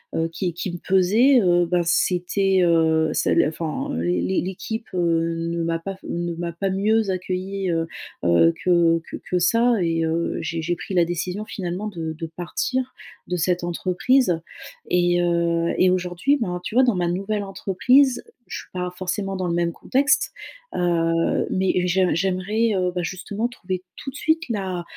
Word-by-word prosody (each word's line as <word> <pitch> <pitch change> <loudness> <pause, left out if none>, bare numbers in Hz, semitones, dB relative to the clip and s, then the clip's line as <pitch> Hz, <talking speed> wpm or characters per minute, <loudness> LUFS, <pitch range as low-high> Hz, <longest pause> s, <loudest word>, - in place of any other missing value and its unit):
heu, 165 0 +1
qui 175 0 -2
qui 175 +1 -4
me - - -4
pesaient, 210 +10 +4
heu, 175 -1 +3
ben, 175 +1 +1
c'était, 185 +2 +2
heu, 160 -2 +3
ça - - +1 0.2
enfin, 155 0 -4
l'é 90 +2 0
l'équipe, 220 +5 -5
heu, 165 -1 +1
ne 170 0 -2
m'a 165 0 -1
pas 195 +3 -5
ne 170 0 -3
m'a 170 0 -4
pas 195 +4 -2
mieux 210 +2 +1
accueillie, 185 +1 -2
heu, 165 0 0 0.4
heu, 85 -1 +5
que 170 -2 +4
que - - -5
que 180 - +1
ça, 230 +7 +3
et 165 -1 +1
heu, 165 +1 -1
j'ai 165 +1 -3
j'ai 175 +2 -1
pris 190 - -7
la 175 -2 +4
décision, 180 +4 -3
finalement, 190 +1 -4
de 165 -5 -4
de 165 +1 -6
partir 255 +9 -2 0.3
de 180 - -1
cette 175 +1 0
entreprise 180 +3 +1 0.5
et, 175 0 +3
heu, 170 -1 +1
et 185 - +5
aujourd'hui, 180 +10 +1
ben, 180 -4 -2
tu 220 - -5
vois, 260 - +6
dans 240 -6 +3
ma 175 -1 0
nouvelle 200 +4 -1
entreprise, 245 +8 +2 0.3
je - - -5
suis - - -13
pas 180 0 -3
forcément 195 +1 -2
dans 185 -1 -2
le 170 - -1
même 170 0 +1
contexte. 275 - +1 0.4
Heu, 165 -1 +1
mais 185 -1 +1
j'ai 185 0 +2
j'aimerais, 195 +5 0
heu, 180 -1 +1
bah, 180 - 0
justement, 200 +6 -3
trouver 185 -6 -5
tout 270 - -7
de - - -17
suite 320 +3 +1
la 190 -5 -2
180 Hz, 175 wpm, -23 LUFS, 170-195 Hz, 0.5 s, vois